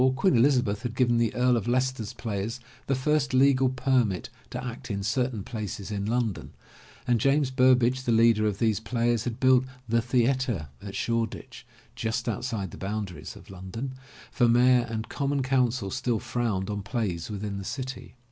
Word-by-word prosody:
Queen 185 +2 +3
Elizabeth 120 -4 +3
had 125 -2 -4
given 120 -1 +3
the 115 -2 +1
Earl 125 +1 +3
of 115 -2 -2
Leicester's 130 -3 0
players 110 +3 -4 0.3
the 135 - +2
first 140 0 +1
legal 130 0 +4
permit 125 -7 +1 0.2
to 125 +1 -5
act 125 0 -7
in 100 -2 -2
certain 115 0 -1
places 105 -2 -5
in 100 0 -2
London, 115 -3 -1 0.5
and 120 -3 +2
James 140 0 +2
Burbage, 130 0 +4
the 125 - -1
leader 115 -1 +4
of 100 -2 -1
these 110 -2 +1
players 115 0 0
had 120 -2 -4
built 130 -1 +5 0.2
The 115 +1 +2
Theatre 120 - 0
at 100 -1 -7
Shoreditch, 115 -2 -3 0.3
just 115 +1 -2
outside 115 -4 -2
the - - -10
boundaries 100 -2 -5
of - - -13
London, 95 +8 -6 0.4
for 120 - +3
mayor 120 +1 +4
and 110 -1 -4
common 140 -1 -1
council 125 -5 +1
still 125 -2 0
frowned 105 -5 -2
on 105 0 -3
plays 100 -4 -3
within 100 -1 -4
the - - -6
city. 125 +2 -6
120 Hz, 170 wpm, -27 LUFS, 105-130 Hz, 0.5 s, built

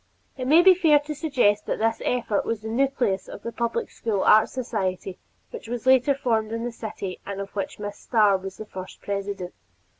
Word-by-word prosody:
It 255 -1 -4
may 320 +5 +6
be 380 0 +8
fair 325 -5 +4
to 300 +1 -5
suggest 255 -9 +1
that - - -1
this 225 +1 0
effort 235 -5 0
was 230 -2 -3
the 220 - -6
nucleus 245 -5 0
of - - -10
the 235 - -4
Public 235 0 -2
School 210 -4 -2
Art 215 +1 +6
Society 195 -7 -3 0.3
which - - -8
was 240 0 -5
later 260 +2 +4
formed 225 -5 0
in 230 0 -3
the 240 - -3
city 210 -5 -6
and 200 -1 -6
of 200 0 -6
which 200 - -4
Miss 205 0 -6
Starr 210 -4 +3
was 190 0 -8
the 215 - -7
first 185 -2 -9
president. 200 -2 -4
225 Hz, 205 wpm, -25 LUFS, 200-255 Hz, 0.3 s, be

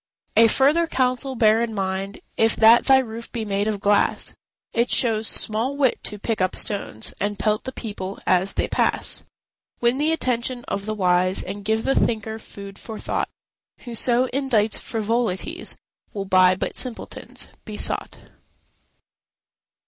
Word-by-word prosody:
A 225 +1 +7
further 290 +8 +3
counsel 260 -1 0
bear 220 -1 +4
in 230 -2 -2
mind: 195 +1 -3
If 225 0 +2
that 230 +2 +6
thy 270 -1 +6
roof 230 -3 -4
be 230 -2 -3
made 200 0 -1
of 210 -2 -1
glass, 205 0 +1 0.4
It 235 +1 +1
shows 225 -3 +3
small 230 +6 +2
wit 265 -4 +1
to 210 - -5
pick 215 0 -2
up 185 0 +1
stones 195 - -2
To 205 +1 -1
pelt 215 +1 0
the 260 - -3
people 200 -5 -6
as 185 +2 +2
they - - -1
pass. - - +1 0.6
Win 240 +3 +2
the 305 +2 +2
attention 250 -5 -1
of 200 +1 -3
the 215 - -2
wise, 185 -1 +2
And 200 +2 -7
give 220 +2 0
the 270 - +2
thinker 220 -2 0
food 200 -2 -11
for 220 -2 -8
thought; - - -2 0.5
Whoso 240 +1 0
indites 240 -6 +1
frivolities, 230 - -2 0.4
Will 200 -1 -3
but 185 -1 +5
by - - -2
simpletons 250 -3 -6
be 215 -2 -7
sought. - - -2
220 Hz, 155 wpm, -23 LUFS, 200-245 Hz, 0.6 s, A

